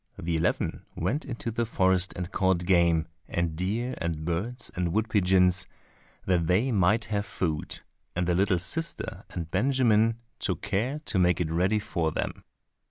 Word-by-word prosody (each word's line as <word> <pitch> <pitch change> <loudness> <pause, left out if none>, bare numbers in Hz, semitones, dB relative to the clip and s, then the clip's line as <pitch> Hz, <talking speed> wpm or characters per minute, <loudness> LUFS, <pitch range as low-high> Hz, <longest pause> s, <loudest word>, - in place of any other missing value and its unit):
The 85 0 -2
eleven 80 +2 0
went 115 - -1
into 120 -3 -4
the 120 +2 0
forest 95 -4 +3
and 90 +1 -4
caught 95 -3 +1
game, 85 -3 +3 0.2
and 85 -2 -1
deer, 110 +9 -1
and 80 -3 -3
birds, 110 +9 -2
and 90 -2 0
wood 110 +2 +1
pigeons 90 -2 +3 0.6
that 90 -3 +2
they 105 +10 +2
might 105 +2 +3
have 100 0 +1
food, 80 -7 -3 0.3
and 90 +1 0
the 90 - +2
little 95 +1 +3
sister 155 - -2
and 85 -2 -6
Benjamin 115 -1 +3 0.2
took 90 -6 -2
care 115 +10 -1
to 95 - 0
make 90 -1 +3
it 80 -3 -1
ready 95 +6 +2
for 85 -6 -1
them. - - -4
95 Hz, 165 wpm, -28 LUFS, 85-110 Hz, 0.6 s, forest